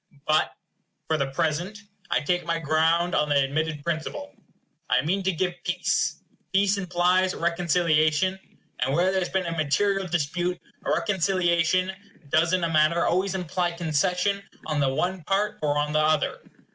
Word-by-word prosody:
But, 155 0 +2 0.5
for 160 - +1
the 140 -3 -1
present, 160 +8 -1 0.3
I - - +1
take 180 +4 0
my 170 0 -1
ground 165 +3 +2
on 150 0 +1
the 145 - +2
admitted 145 +2 0
principle. 170 - -4 0.6
I - - +3
mean 190 +5 0
to 190 0 +1
give 180 +1 -1
peace. 180 0 -1 0.3
Peace 200 +1 +2
implies 180 0 +1
reconciliation; 170 +1 +1 0.4
and 135 +2 0
where 180 +3 +3
there 190 0 0
has 175 - -2
been 190 -1 -1
a 170 - -2
material 190 +6 +1
dispute, 175 +2 -1 0.2
reconciliation 185 -1 +1 0.4
does 160 +4 +3
in 185 -1 +1
a 165 -1 -1
manner 155 +2 +3
always 190 +2 +1
imply 180 -1 -1
concession 180 +4 0 0.2
on 155 -2 -1
the 140 -2 +2
one 180 +6 -2
part 205 +2 0
or 145 -1 +1
on 150 0 0
the 155 - +3
other. 155 0 +1
170 Hz, 160 wpm, -25 LUFS, 155-185 Hz, 0.6 s, I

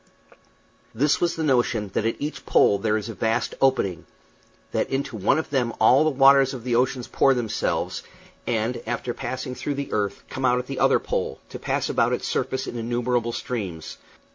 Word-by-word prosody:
This 145 +6 +2
was 175 -1 +1
the 160 - -2
notion 120 -7 +1
that 110 - 0
at 115 - -1
each 150 +2 -5
pole 100 - +4
there 110 0 +1
is 105 0 -5
a 115 - -5
vast 115 +3 -1
opening; 110 -11 +1 0.6
that - - -1
into 135 -2 -2
one 105 +7 +2
of 160 - -3
them 125 -4 0
all 125 +6 +6
the 155 - +3
waters 135 -1 +5
of 120 - -8
the 125 -1 -2
ocean 125 +1 +1
pour 135 -1 +4
themselves, 115 -4 -2 0.5
and, 115 +2 -1
after 120 +1 -2
passing 130 +1 -5
through 145 +2 -3
the 140 0 -5
earth, 100 -2 -1
come 130 - -6
out 125 -1 +3
at 125 - -3
the 135 0 -5
other - - +4
pole, - - -3
to - - -8
pass - - -1
about - - +1
its - - -2
surface 130 0 -1
in 120 - -5
innumerable 120 0 -1
streams. 95 -10 -5
125 Hz, 190 wpm, -24 LUFS, 115-135 Hz, 0.6 s, all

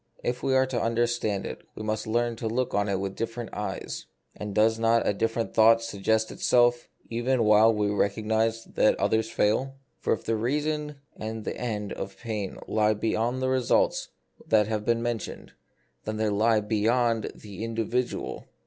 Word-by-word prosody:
If 120 0 -2
we 135 - +1
are 130 0 +5
to 130 -2 -2
understand 115 -3 0
it, - - -6
we - - -6
must 110 +1 -2
learn 120 +1 0
to 115 - -3
look 120 +3 -1
on 100 0 +1
it 95 -1 0
with 95 0 -3
different 115 0 -4
eyes. 105 0 -5 0.3
And 105 -1 -6
does 110 +1 +3
not 115 0 +3
a - - +3
different 115 +2 -1
thought 115 +1 +6
suggest 110 0 0
itself 120 -1 +3 0.2
even 120 +1 +1
while 110 +1 +6
we 105 -2 0
recognise 110 +2 0
that - - +2
the - - -14
others 110 0 +1
fail? 130 +7 +1 0.2
For - - +1
if - - -4
the 115 - 0
reason 150 +5 -1 0.2
and 110 0 -5
the - - -3
end 105 -4 -3
of 95 0 -6
pain 105 -5 -4
lie 110 0 +2
beyond 115 +4 -1
the 130 - +1
results 130 -2 +2 0.4
that 105 -1 +4
have 105 0 -2
been 115 0 +1
mentioned, 120 -3 -4 0.5
then 110 - -3
they 110 0 +1
lie 110 +2 +3
beyond 115 +2 +1
the 105 0 -8
individual. 115 +2 -2
115 Hz, 175 wpm, -27 LUFS, 105-120 Hz, 0.5 s, thought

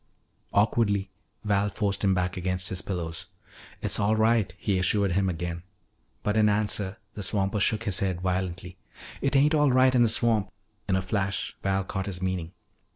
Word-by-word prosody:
Awkwardly 100 -1 +2 0.3
Val 105 -1 +1
forced 100 -2 -1
him 95 -1 +3
back 90 0 -1
against 90 0 -2
his 95 0 -3
pillows. 85 -3 -4 0.6
"It's - - 0
all 105 +2 +2
right," 110 -1 +2
he 100 -3 0
assured 100 +1 +2
him 95 +1 +1
again. 85 0 -4 0.6
But 105 - 0
in 105 -1 +5
answer 105 -1 0 0.2
the 105 - -6
swamper 100 +1 0
shook 110 +3 +2
his 100 -4 0
head 95 -3 -1
violently, 90 -1 -3 0.4
"It 140 +1 0
ain't 145 +3 +4
all 150 -3 +4
right 130 0 +5
in 125 - +4
the 120 - +5
swamp." 110 -2 +1 0.4
In 95 - +3
a 95 - 0
flash 95 -1 -2
Val 95 0 0
caught 95 0 -4
his 95 -3 -4
meaning. 90 -3 -2
100 Hz, 175 wpm, -27 LUFS, 95-110 Hz, 0.6 s, in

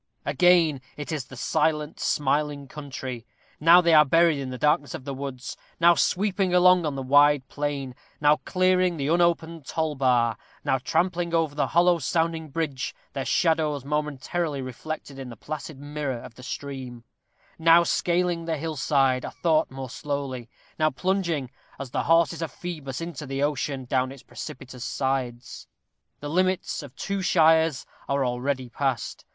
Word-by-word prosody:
Again 170 -6 +4 0.2
it 145 +2 -6
is 150 -6 -3
the 130 - -12
silent, 150 +3 0
smiling 145 0 0
country. 130 -4 -7 0.4
Now 170 +3 +7
they 170 -1 +3
are 155 -1 +8
buried 165 +1 +3
in 135 -1 -4
the 130 - -5
darkness 145 +2 +1
of 130 - -9
woods; 135 -2 -5 0.2
now 170 +1 +7
sweeping 190 +1 +1
along 180 -2 +5
on 145 - -3
the 135 - -4
wide 145 0 +4
plain; 145 -3 -3 0.3
now 150 0 +4
clearing 185 -1 +1
the 140 0 -1
unopened 165 -2 +1
toll 160 -1 -1
bar; 125 -5 +2 0.3
now 130 - +2
trampling 170 +4 0
over 160 -3 +1
the 145 - 0
hollow 175 0 +3
sounding 165 +2 -1
bridge, 145 -3 -3 0.2
their 135 -2 -3
shadows 155 -5 +1
momently 150 +1 -2
reflected 135 +2 -6
in 130 -2 -7
the 120 - -9
placid 155 +3 -7
mirror 145 -2 -4
of 115 - -10
the 125 - -14
stream; 130 -2 -6 0.6
now 165 +1 +6
scaling 175 0 0
the 165 -1 -1
hill 160 +1 -4
side 135 -2 +2
a - - -4
thought 160 -2 +1
more 130 0 -7
slowly; 135 -4 -4 0.3
now 155 0 +4
plunging, 170 -4 -1 0.3
as 135 -3 -7
the - - 0
horses 165 -1 +3
of 165 - -3
Phœbus 150 -7 -6
into 165 -3 -6
the 135 +1 -2
ocean, 140 -2 -1
down 130 +1 0
its 135 -1 -12
precipitous 130 -4 -8
sides. 130 -3 -3 0.5
The 145 - -5
limits 185 +1 0
of 140 -4 -12
two 200 0 -3
shires 160 -4 +3 0.2
are 140 -1 +1
already 130 +1 -2
past. 125 -1 -3
150 Hz, 160 wpm, -25 LUFS, 135-165 Hz, 0.6 s, are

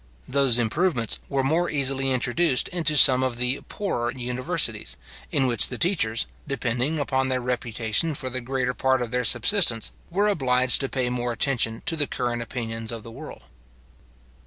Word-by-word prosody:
Those 135 -3 +3
improvements 120 - 0
were 135 -1 0
more 165 +6 0
easily 135 -2 +1
introduced 130 +3 +1
into 160 -4 0
some 130 -2 +8
of 130 -2 -2
the 125 +2 0
poorer 120 -13 -3
universities, 125 - -1 0.3
in 135 - +1
which 120 -5 +3
the 125 - -5
teachers, 120 - 0 0.2
depending 135 +2 -2
upon 130 -2 -1
their 130 -1 0
reputation 120 +3 -2
for 130 - -3
the 130 0 -4
greater 125 0 -2
part 130 -1 0
of 115 - -7
their 125 0 -1
subsistence, 125 - +3 0.2
were 200 +4 0
obliged 130 -10 +3
to 135 - -3
pay 125 -2 -1
more 120 -1 -2
attention 115 -2 -1
to 165 - +1
the 145 -3 +1
current 120 -1 -3
opinions 115 -1 -5
of 115 -2 -7
the 115 - -11
world. 145 +6 -11
130 Hz, 165 wpm, -24 LUFS, 120-140 Hz, 0.3 s, some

